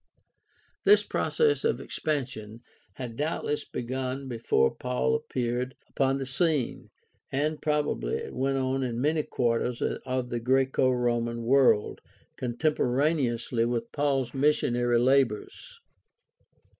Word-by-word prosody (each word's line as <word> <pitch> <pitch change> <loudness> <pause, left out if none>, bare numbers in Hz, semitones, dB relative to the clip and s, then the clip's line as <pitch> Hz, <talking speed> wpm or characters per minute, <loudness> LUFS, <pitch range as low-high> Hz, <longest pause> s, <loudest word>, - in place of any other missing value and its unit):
This 415 +1 +6
process 450 -2 +1
of 455 - +1
expansion 120 -7 -4 0.3
had 125 -3 -6
doubtless 150 +1 -2
begun 130 +2 -4
before 115 - +1
Paul 65 +1 -1
appeared 125 - -2
upon 135 0 +1
the 135 - -3
scene, 145 -1 0 0.4
and 150 +3 -1
probably 150 - 0
it - - -5
went 135 +2 0
on 130 0 0
in 120 -2 -2
many 155 +4 +2
quarters 120 -3 -1
of 130 -1 -2
the 120 - -1
Graeco 130 +2 +2
Roman 120 -1 0
world 130 -3 +3 0.3
contemporaneously 125 -2 0
with 115 -1 -2
Paul's 135 -4 0
missionary 120 -4 +2
labors. 135 - 0
130 Hz, 110 wpm, -28 LUFS, 120-140 Hz, 0.4 s, This